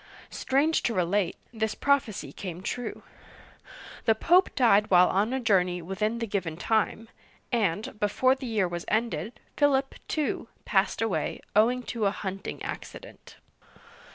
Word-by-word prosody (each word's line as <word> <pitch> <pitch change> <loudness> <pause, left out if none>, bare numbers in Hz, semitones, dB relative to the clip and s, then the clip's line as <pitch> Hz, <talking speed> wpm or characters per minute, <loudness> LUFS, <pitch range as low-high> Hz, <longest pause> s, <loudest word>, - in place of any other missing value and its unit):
Strange 290 +5 +1
to 230 - -1
relate, 180 +1 0 0.2
this 220 -1 -1
prophecy 275 -7 0
came 180 -1 -7
true. 245 +4 -4 1.0
The 225 - +4
Pope 355 +11 +4
died 215 -5 +4
while 180 -1 +6
on 205 +5 +1
a 265 - 0
journey, 185 -6 +2
within 210 +6 -2
the 230 - -2
given 185 -7 -3
time; 220 +3 0 0.4
and, 210 -2 -1
before 255 +5 +3
the 265 -1 -6
year 215 -5 +1
was 175 0 -5
ended, 230 +1 -1 0.2
Philip, 275 -2 +2
too, 300 -6 -2 0.2
passed 200 +2 +1
away, 225 -4 -1 0.2
owing 245 +4 +3
to 225 -5 -1
a - - +4
hunting 195 -1 -6
accident. - - -9
220 Hz, 140 wpm, -27 LUFS, 195-245 Hz, 1.0 s, while